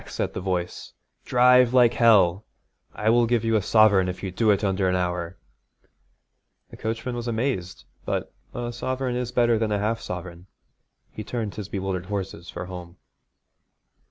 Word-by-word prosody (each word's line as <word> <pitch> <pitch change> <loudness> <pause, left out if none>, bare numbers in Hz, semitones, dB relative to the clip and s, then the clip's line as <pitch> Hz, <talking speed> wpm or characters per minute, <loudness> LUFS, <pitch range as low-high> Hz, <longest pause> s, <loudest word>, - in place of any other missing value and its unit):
said - - -3
the - - -4
voice. 90 -2 -3 0.3
'Drive 125 0 +5
like 120 -2 +5
hell! 100 -5 +4 0.5
I 110 +1 0
will 120 0 +4
give 115 -1 +1
you 115 0 +2
a 110 - +3
sovereign 100 -3 +4
if 90 - -7
you 95 - -3
do 110 +4 +1
it 100 0 +3
under 95 -1 +1
an 90 - +1
hour.' 90 0 -2 1.3
The - - -11
coachman 115 +3 -3
was 120 0 -5
amazed, 115 -6 -2 0.2
but - - -3 0.2
a 120 0 -5
sovereign 130 +1 -3
is 125 -1 -3
better 120 -2 +2
than 110 -1 -1
a 105 - +1
half 110 +3 -1
sovereign. 90 0 -7 0.6
He 110 - -7
turned 110 -2 -4
his 105 -2 -7
bewildered 95 -2 -3
horses 95 -3 -5
for - - -6
home. 90 -1 -9
105 Hz, 165 wpm, -24 LUFS, 95-120 Hz, 1.3 s, Drive